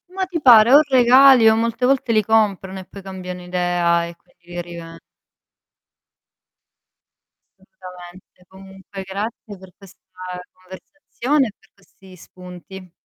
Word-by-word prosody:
Ma 380 - -2
ti 355 -4 -6
pare? 240 -2 +6
O 295 - +8
regali, 255 -1 +5
o 220 - +2
molte 230 +2 -2
volte 260 -2 0
li 215 -2 +1
comprano 195 -3 -1
e 185 - -11
poi 200 - -13
cambiano 185 -1 -9
idea 175 -1 -1
e 170 - -12
quindi 175 0 -36
li 175 0 -7
riven 170 -1 -11 2.6
Assolutamente. 180 -1 -16
Comunque 190 +1 -12
grazie 205 +2 -7
per 190 0 -16
questa 195 -2 -19 0.5
conversazione 255 +8 -4
e 215 - -9
per 195 - -29
questi 190 -1 -20
spunti. 180 +1 -14
190 Hz, 130 wpm, -19 LUFS, 180-230 Hz, 2.6 s, O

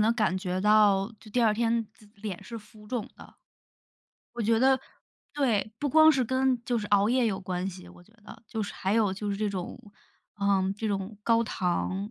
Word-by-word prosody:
地 215 +2 +4
感 215 -5 +1
觉 185 -1 -3
到， 210 0 +4
就 215 - -14
第 245 +3 +1
二 220 -2 +4
天 230 0 0
自 215 -2 -20
脸 200 -3 -6
是 235 - -8
浮 210 0 -17
肿 230 -1 -3
的。 - - -15 1.0
我 240 - -3
觉 225 +1 +2
得 265 +2 +4 0.5
对， 225 -8 0
不 290 - -1
光 315 +3 +7
是 265 -5 +2
跟 260 0 +1
就 245 - 0
是 210 -2 -3
熬 205 0 +4
夜 250 +1 +2
有 195 -4 -1
关 180 -1 -3
系， 185 0 -12
我 175 - -16
觉 215 - -24
得， - - -12
就 225 - -4
是 200 - -6
还 195 +2 -1
有 215 -4 +2
就 205 +1 -4
是 200 - -2
这 210 +1 -1
种 185 -3 -5 0.6
嗯， 195 -1 +2
这 220 +1 -3
种 200 +1 -3
高 230 +1 +3
糖 190 +1 -2
215 Hz, 225 characters per minute, -28 LUFS, 195-230 Hz, 1.0 s, 光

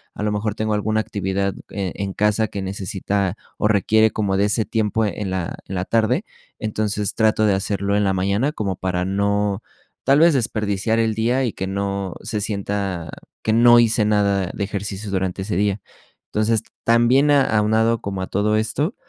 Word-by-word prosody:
a - - -4
lo 105 - 0
mejor 105 0 -1
tengo 110 0 -1
alguna 110 +1 0
actividad, 100 -2 -2 0.2
eh, 95 -3 -3
en 100 -1 -3
casa 105 +2 +1
que 100 - -5
necesita 95 0 -2 0.2
o - - +2
requiere 110 +1 +3
como 100 -3 -1
de 100 - +3
ese 105 +2 0
tiempo 110 0 0
en 100 0 -3
la 95 -2 -3
en 95 - -6
la 90 0 -2
tarde, 110 0 +1 0.3
entonces, 105 -1 -2
trato 110 -1 +3
de 105 - +3
hacerlo 100 +1 -1
en 105 - +2
la 95 -1 +2
mañana 100 +9 +1
como 100 -7 -2
para 90 -1 -1
no, 100 +1 0 0.4
tal 135 +2 +5
vez, 165 +1 +6
desperdiciar 110 -2 0
el 115 -1 +1
día 120 +4 +1
y 120 - 0
que 95 - -4
no 100 -1 -2
se 105 - -3
sienta 100 -4 -3 0.3
que 110 - +1
no 120 +1 +7
hice 115 -2 +3
nada 100 -3 +2
de 100 - -3
ejercicio 100 0 -4
durante 95 0 -1
ese 95 -2 -3
día, 100 0 0 0.5
entonces, 110 +1 +1 0.2
también 120 +5 +4
a 140 -2 +5
aunado 110 +2 +2
como 95 -1 -4
a 95 - -3
todo 105 +2 +1
esto, 140 - -1
105 Hz, 185 wpm, -21 LUFS, 100-110 Hz, 0.5 s, no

